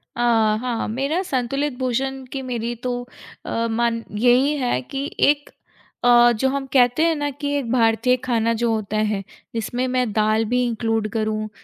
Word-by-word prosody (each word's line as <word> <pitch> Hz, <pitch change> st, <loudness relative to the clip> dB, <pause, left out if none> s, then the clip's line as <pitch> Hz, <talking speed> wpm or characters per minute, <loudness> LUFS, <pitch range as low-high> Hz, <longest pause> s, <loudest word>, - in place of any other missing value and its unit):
अ, 240 Hz, -, -2 dB, 0.4 s
हाँ, 245 Hz, -2 st, -2 dB
मेरा 275 Hz, +10 st, -1 dB
संतुलित 275 Hz, -1 st, -2 dB
भोजन 265 Hz, +1 st, -1 dB
की 270 Hz, -, -4 dB
मेरी 240 Hz, -2 st, -3 dB
तो 245 Hz, -1 st, -2 dB, 0.4 s
अ, 230 Hz, 0 st, -1 dB
मन 230 Hz, 0 st, 0 dB
यही 250 Hz, +5 st, +4 dB
है 245 Hz, -, 0 dB
कि 275 Hz, -, -5 dB, 0.2 s
एक 290 Hz, 0 st, 0 dB, 0.5 s
अ, 240 Hz, 0 st, +6 dB
जो 265 Hz, +4 st, 0 dB
हम 275 Hz, 0 st, -2 dB
कहते 245 Hz, +3 st, +4 dB
हैं 330 Hz, -1 st, +3 dB
ना 290 Hz, -1 st, -2 dB
कि 285 Hz, 0 st, -1 dB
एक 250 Hz, -5 st, -3 dB
भारतीय 245 Hz, +1 st, +3 dB
खाना 230 Hz, -2 st, +1 dB
जो 230 Hz, 0 st, 0 dB
होता 215 Hz, -1 st, -2 dB
है, 210 Hz, -2 st, 0 dB, 0.3 s
जिसमें 240 Hz, +3 st, -2 dB
मैं 250 Hz, -3 st, 0 dB
दाल 215 Hz, +1 st, +2 dB
भी 250 Hz, +3 st, +1 dB
इंक्लूड 225 Hz, -2 st, -1 dB
करूँ, 215 Hz, -1 st, -1 dB
245 Hz, 170 wpm, -22 LUFS, 225-265 Hz, 0.5 s, अ